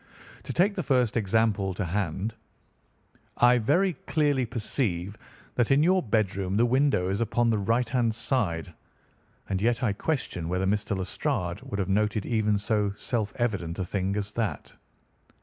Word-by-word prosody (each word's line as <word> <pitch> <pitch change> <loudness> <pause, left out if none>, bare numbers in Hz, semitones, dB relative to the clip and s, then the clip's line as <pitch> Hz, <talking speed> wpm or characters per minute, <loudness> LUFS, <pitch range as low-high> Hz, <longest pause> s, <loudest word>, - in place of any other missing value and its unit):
To - - -4
take 195 +4 +3
the 190 - -2
first 125 -7 +1
example 105 -3 +1
to 100 - -2
hand, 95 +3 -2 1.0
I 120 0 +5
very 175 - +2
clearly 145 -5 +1
perceive 105 -5 -2 0.4
that 120 -2 +1
in 140 +2 +4
your 185 +2 +4
bedroom 100 - 0
the 120 - +4
window 130 -6 +2
is 100 +3 -1
upon 115 +1 +2
the 110 - +1
right 115 +4 +1
hand 115 -2 +1
side, 105 - -1 0.7
and 95 -1 -1
yet 120 +3 +1
I 110 -5 +2
question 100 - -3
whether 90 +2 0
Mr. 100 0 0
Lestrade 95 - -2
would 130 -6 -5
have 95 -3 -1
noted 105 +1 +1
even 105 -3 +1
so 105 -1 0
self 110 -5 -2
evident 100 -9 -2
a 95 - -2
thing 95 +1 -1
as 100 -1 -3
that." 110 -2 -3
110 Hz, 160 wpm, -27 LUFS, 100-120 Hz, 1.0 s, I